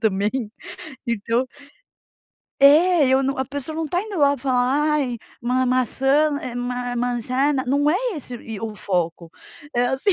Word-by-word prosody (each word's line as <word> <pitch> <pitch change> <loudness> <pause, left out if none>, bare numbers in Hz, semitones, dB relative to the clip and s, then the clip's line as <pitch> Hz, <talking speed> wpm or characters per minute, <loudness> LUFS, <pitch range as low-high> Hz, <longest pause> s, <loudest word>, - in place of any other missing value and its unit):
também, 205 0 +1 0.8
então 235 +3 0 1.2
É, 310 +2 +6
eu 265 +1 +3
não 270 +1 -1
a 265 - -1
pessoa 285 +3 -5
não 325 - -2
tá 350 +4 -1
indo 410 -3 -5
lá 285 -1 +4
falar: 270 +3 +1
"Ai, 250 -6 -1 0.2
ma 255 +1 +1
maçã, 270 +4 +2
eh 250 -6 -6
ma 245 0 -3
manzana", 255 +3 0
não 285 +3 +2
é - - +2 0.2
esse, 255 -5 -7
e, 225 -3 -8
o 220 0 -5
foco, 170 -4 -2 0.4
é 245 +1 +2
assim, 270 +10 +1
260 Hz, 155 wpm, -22 LUFS, 240-285 Hz, 1.2 s, É